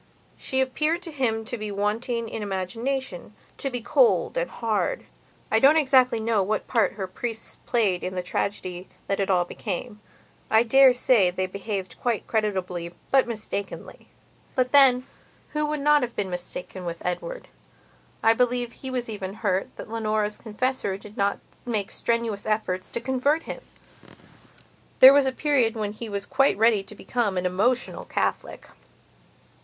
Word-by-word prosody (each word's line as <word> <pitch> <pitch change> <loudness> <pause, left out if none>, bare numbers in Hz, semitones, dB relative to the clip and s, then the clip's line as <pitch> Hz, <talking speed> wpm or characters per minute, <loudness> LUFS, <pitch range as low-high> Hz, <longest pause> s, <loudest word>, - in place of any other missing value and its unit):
She 265 0 -1
appeared 305 +6 0
to 335 - -8
him 230 -6 -1
to 240 +1 -5
be 215 0 -4
wanting 225 +4 -1
in 225 - -5
imaginationto 215 +4 -4
be 245 -1 -3
cold 475 - +3
and - - -1
hard. 230 - -1 0.5
I 220 - +4
don't 280 +6 +6
exactly 260 -5 +4
know 220 -2 +1
what 205 +2 -1
part 230 -4 +1
her 200 -2 -4
priests 225 +4 -4
played 205 -7 +1
in 185 +1 -4
the 180 - -2
tragedy 185 -1 -3 0.2
that 195 - -1
it 195 - 0
all 180 -2 +3
became; 210 +3 -6 0.5
I 220 +1 +5
dare 260 +2 +6
say 235 -6 +4
they 185 +1 -2
behaved 195 0 -5
quite 240 -3 -1
creditably 185 -5 -2 0.2
but 270 -2 +4
mistakenly. 210 -3 -6 0.5
But 255 -1 +1
then, 260 -3 +6 0.4
who 300 0 -1
would 300 -1 -2
not 295 +1 +4
have 240 -1 -3
been 195 -3 -2
mistaken 180 +1 -5
with 170 -1 -6
Edward? - - -4 0.8
I 225 - +6
believe 245 0 0
he 265 - -7
was 250 -2 -2
even 200 -3 -5
hurt 200 -4 -1
that - - -8
Leonora's 215 -1 -1
confessor 225 -2 -2
did 205 +1 -13
not 200 0 +1 0.3
make 215 -4 -2
strenuous 230 -3 -1
efforts 200 -4 -1
to - - -3
convert 265 +6 +1
him. - - -7 1.4
There 265 +1 +10
was 280 -1 +4
a - - +2
period 260 -5 +1
when 210 -2 -3
he 220 +1 -7
was 200 -1 -3
quite 275 -4 +2
ready 220 -1 +4
to 195 +2 -11
become 215 -4 -1
an 180 - -1
emotional 215 +8 0
Catholic. - - -2
225 Hz, 160 wpm, -25 LUFS, 200-255 Hz, 1.4 s, There